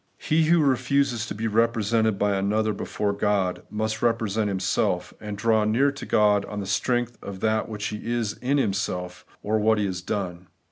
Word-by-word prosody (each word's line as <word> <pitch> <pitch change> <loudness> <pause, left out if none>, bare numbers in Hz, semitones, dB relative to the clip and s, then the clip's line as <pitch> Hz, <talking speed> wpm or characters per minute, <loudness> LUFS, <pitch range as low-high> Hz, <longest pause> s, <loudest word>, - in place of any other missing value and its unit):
He 155 +1 +2
who 165 0 +4
refuses 130 -2 +1
to - - -5
be 110 +2 -3
represented 110 -1 +2
by 105 0 +1
another 105 +3 +1
before 100 0 -2
God, 100 -3 0
must 110 0 -2
represent 110 -3 +1
himself, 95 -1 0
and 105 -1 -5
draw 110 0 +2
near 120 +7 +3
to 140 - -9
God 105 -1 +3
on 105 - -6
the 100 - -4
strength 120 +4 -1
of 95 -2 -8 0.2
what 105 -2 -6
he 105 +3 -4
is 115 -3 -1
in 135 +4 +1
himself, 95 -6 -2 0.2
or 110 +1 +1
what 110 +1 +3
he 105 - +1
has 90 -2 -3
done. 90 -2 -4
105 Hz, 180 wpm, -25 LUFS, 100-115 Hz, 0.2 s, who